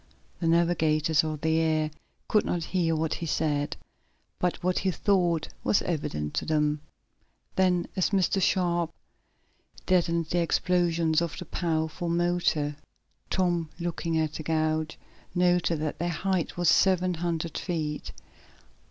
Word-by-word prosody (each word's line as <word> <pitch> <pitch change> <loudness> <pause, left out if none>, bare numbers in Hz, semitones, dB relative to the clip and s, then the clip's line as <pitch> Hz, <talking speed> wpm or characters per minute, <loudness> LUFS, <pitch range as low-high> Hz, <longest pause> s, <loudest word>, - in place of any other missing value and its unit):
The 165 - -1
navigators 160 -2 +3
of 155 -2 -3
the 160 0 +2
air 155 -1 +1 0.4
could 210 - +3
not 175 -2 -1
hear 165 -2 0
what 160 0 0
he 170 - -4
said, 150 -2 0 0.6
but 180 0 -1
what 180 0 +1
he 190 - 0
thought 175 -4 +1
was 205 - +2
evident 75 - -2
to - - -1
them. 150 -1 +1 0.7
Then, 180 -2 +2
as 185 - +2
Mr. 195 -1 +2
Sharp 175 -3 +1 0.9
deadened 170 -2 +2
the 175 +3 0
explosions 170 -1 +2
of 170 -2 -3
the 180 - -6
powerful 160 0 -2
motor. 170 -4 +1 0.5
Tom, 175 -4 +1
looking 170 -1 -2
at 155 -1 -1
a - - -4
gauge, 155 0 0 0.4
noted 175 -2 +2
that 155 0 -3
their 175 +1 0
height 180 +1 -1
was 175 -1 +1
seven 185 +1 +4
hundred 170 -1 -3
feet. 155 -4 -3
170 Hz, 135 wpm, -27 LUFS, 155-175 Hz, 0.9 s, seven